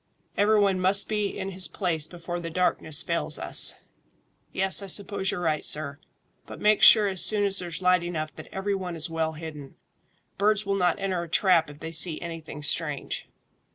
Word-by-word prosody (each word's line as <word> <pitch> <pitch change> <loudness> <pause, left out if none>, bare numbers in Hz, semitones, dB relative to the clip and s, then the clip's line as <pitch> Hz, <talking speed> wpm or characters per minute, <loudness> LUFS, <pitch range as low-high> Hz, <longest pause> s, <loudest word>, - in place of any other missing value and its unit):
Every 210 +1 +3
one 195 -2 +2
must 190 +2 +4
be 210 -1 -1
in 195 -1 -5
his 185 -1 -4
place 165 -6 -2
before 175 0 -6
the 165 -1 -6
darkness 160 -3 -1
fails 170 0 -1
us." - - +2 0.8
"Yes, 190 +1 +1
I 200 - -7
suppose 195 0 0
you're - - -2
right, 155 -3 -1
sir; 145 -1 +1 0.5
but - - -10
make 210 0 +3
sure 215 -2 +8
as 190 -2 0
soon 210 -1 +2
as 195 -1 +4
there's 175 0 -3
light 180 -1 +4
enough 155 -3 -5
that 155 - -11
every 195 +1 -2
one 185 -3 -4
is 165 0 -5
well 160 -1 -2
hidden. 155 -3 -9 0.6
Birds 210 0 +2
will 200 - -1
not 180 -1 +1
enter 190 -3 -2
a 170 - -8
trap 170 -3 +3
if 145 0 -14
they 160 - -6
see 165 0 0
anything 160 -3 -8
strange." 150 -1 -3
180 Hz, 190 wpm, -26 LUFS, 160-195 Hz, 0.8 s, sure